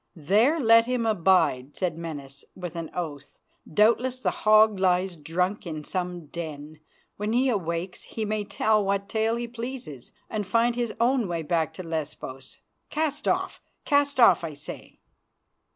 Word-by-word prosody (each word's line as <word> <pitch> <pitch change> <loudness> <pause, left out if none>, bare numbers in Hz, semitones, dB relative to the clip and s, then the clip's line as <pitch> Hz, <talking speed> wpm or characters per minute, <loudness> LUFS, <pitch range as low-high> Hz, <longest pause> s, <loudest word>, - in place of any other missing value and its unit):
"There 215 - +3
let 230 -2 +6
him 250 -2 0 0.2
bide," 145 -7 +3
said 180 -4 -1
Menas, 145 -5 -8
with 175 -2 -7
an 165 -1 -5
oath. 145 -5 -6 0.3
"Doubtless 235 +7 +3
the - - 0
hog 215 -1 +4
lies 185 0 +2
drunk 180 +6 -2
in 155 -2 -5
some 180 0 -4
den. 155 -1 -7 0.4
When 210 +2 -2
he 260 +2 +3
awakes 180 -4 -2
he 220 - -5
may 215 0 -1
tell 215 +1 +1
what 200 0 -1
tale 220 +1 0
he 235 0 -3
pleases 235 - -7 0.2
and 210 -3 -3
find 230 +4 +2
his 240 -2 -1
own 240 -1 +2
way 170 -2 -3
back 160 -1 0
to 185 - -6
Lesbos. 150 -5 -6 0.3
Cast 305 -1 -2
off, - - 0 0.2
cast 285 -2 +2
off! 190 -8 +6
I 155 -3 -5
say." 140 - -10
190 Hz, 155 wpm, -26 LUFS, 165-230 Hz, 0.4 s, let